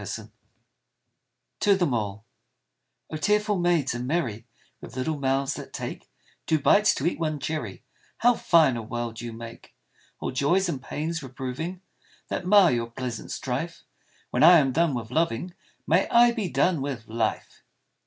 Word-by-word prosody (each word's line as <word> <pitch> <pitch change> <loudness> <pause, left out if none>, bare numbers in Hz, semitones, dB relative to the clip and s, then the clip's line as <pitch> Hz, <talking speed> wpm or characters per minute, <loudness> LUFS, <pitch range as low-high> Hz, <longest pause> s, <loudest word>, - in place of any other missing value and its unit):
95 - - -7 1.3
TO 205 -2 +4
THEM 175 -8 0
ALL 105 -1 -3 0.9
OH, 155 - -3
tearful 210 +3 +1
maids 175 -5 +1
and 120 +1 -4
merry, 125 -8 -2 0.3
With - - -11
little 145 +4 -2
mouths 135 0 0
that - - -9
take - - -6 0.4
Two 160 - +3
bites 210 +8 +4
to 135 - -3
eat 170 - 0
one 155 -2 -1
cherry, 155 +3 -4 0.3
How 245 +1 +4
fine 160 - +4
a - - -3
world 115 0 -5
you 120 -1 -5
make 115 0 -11 0.2
' - - -34
All - - -3
joys 145 +9 +2
and 145 -7 -3
pains 160 +4 -4
reproving 135 +7 -5 0.5
That 180 - -3
mar 195 -3 +6
your 115 -1 -1
pleasant 120 -1 -6
strife - - -4 0.5
When 125 - 0
I 170 +3 +9
am 135 -4 +3
done 160 0 +1
with 115 -1 -5
loving, 165 +3 -1 0.3
May 170 +5 +2
I 240 0 +6
be 220 -6 -3
done 170 -4 +1
with 135 -5 -5
life 110 -1 -3
145 Hz, 165 wpm, -26 LUFS, 120-175 Hz, 1.3 s, I